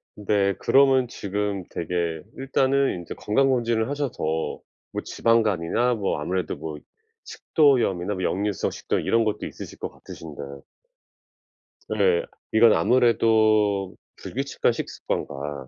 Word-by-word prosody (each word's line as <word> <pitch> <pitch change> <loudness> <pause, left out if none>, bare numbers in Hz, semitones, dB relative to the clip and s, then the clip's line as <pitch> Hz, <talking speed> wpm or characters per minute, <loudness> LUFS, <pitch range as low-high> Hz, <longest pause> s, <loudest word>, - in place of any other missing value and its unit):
근데 100 -2 +1
그러면 135 -2 +4
지금 100 -3 -3
되게 85 -2 -2 0.2
일단은 135 +1 +1
인제 85 -1 -7
건강검진을 120 -1 +1
하셔서 145 -2 -2 0.8
뭐 - - -3
지방간이나 115 +1 +1
뭐 100 -7 -1
아무래도 90 +2 -2
뭐 75 -2 -6 0.5
식도염이나 105 - +1
뭐 95 - -4
역류성 100 0 -1
식도염 - - -2
이런 115 0 +3
것도 105 0 -2
있으실 - - -9
것 - - -4
같으신데 80 -4 -10 1.5
예. 465 0 +3 0.3
이건 110 0 +6
아무래도 110 -5 +3 0.3
불규칙한 135 -2 -1
식습관과 70 - -5
105 Hz, 280 characters per minute, -24 LUFS, 95-125 Hz, 1.5 s, 이건